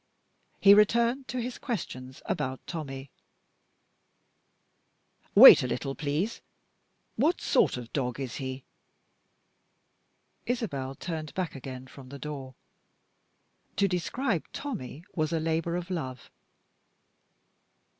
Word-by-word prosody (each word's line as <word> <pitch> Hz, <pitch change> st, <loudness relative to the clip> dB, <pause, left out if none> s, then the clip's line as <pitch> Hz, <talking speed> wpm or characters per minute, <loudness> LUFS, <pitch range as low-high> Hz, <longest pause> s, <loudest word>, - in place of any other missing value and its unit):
He 200 Hz, -, +8 dB
returned 235 Hz, +5 st, +3 dB
to 255 Hz, -, -3 dB
his 245 Hz, +1 st, -4 dB
questions 130 Hz, -, -5 dB
about 130 Hz, -3 st, -3 dB
Tommie. 135 Hz, -4 st, -6 dB, 2.2 s
"Wait -, -, +11 dB
a 125 Hz, -, -1 dB
little, 135 Hz, +2 st, -3 dB
please. 155 Hz, +10 st, -2 dB, 0.8 s
What 305 Hz, +10 st, +2 dB
sort -, -, +2 dB
of 120 Hz, -2 st, -9 dB
dog 125 Hz, -2 st, -2 dB
is 130 Hz, -4 st, -4 dB
he?" 130 Hz, -1 st, -5 dB, 1.8 s
Isabel 140 Hz, -, -2 dB
turned 160 Hz, -2 st, -5 dB
back 185 Hz, -3 st, -2 dB
again 130 Hz, -1 st, -8 dB
from 130 Hz, 0 st, -13 dB
the 140 Hz, -, -8 dB
door. 135 Hz, -2 st, -7 dB, 1.2 s
To 200 Hz, -, +3 dB
describe 185 Hz, -, -1 dB
Tommie 175 Hz, -, -6 dB
was 155 Hz, -2 st, -1 dB
a 165 Hz, -, +1 dB
labor 165 Hz, +1 st, -1 dB
of 180 Hz, +1 st, -4 dB
love. 130 Hz, -8 st, -5 dB
155 Hz, 105 wpm, -28 LUFS, 130-200 Hz, 2.2 s, Wait